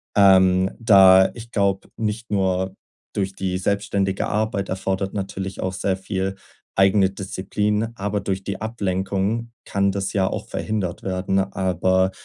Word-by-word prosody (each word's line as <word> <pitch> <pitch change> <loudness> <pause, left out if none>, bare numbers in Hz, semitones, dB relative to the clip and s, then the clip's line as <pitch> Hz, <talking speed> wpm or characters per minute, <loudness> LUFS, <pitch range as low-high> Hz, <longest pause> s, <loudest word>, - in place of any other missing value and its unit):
Ähm, 95 -2 +5
da 95 -4 +7
ich 115 0 -11
glaube, 100 -3 0
nicht 110 +1 -3
nur 95 -1 0 0.4
durch 95 -1 -2
die 95 -1 -2
selbstständige 100 0 0
Arbeit 105 -2 -1
erfordert 95 +1 -2
natürlich 95 -1 -4
auch 95 0 -2
sehr 95 0 -1
viel 95 0 -3 0.4
eigene 95 0 +4
Disziplin, 105 +3 -2
aber 105 -1 -2
durch 95 0 -3
die 100 0 -4
Ablenkung 100 +1 -2
kann 100 0 +1
das 100 0 -3
ja 95 -2 +2
auch - - -5
verhindert 100 -5 -3
werden. 95 0 0
Aber 95 -1 +1
95 Hz, 135 wpm, -22 LUFS, 95-100 Hz, 0.4 s, da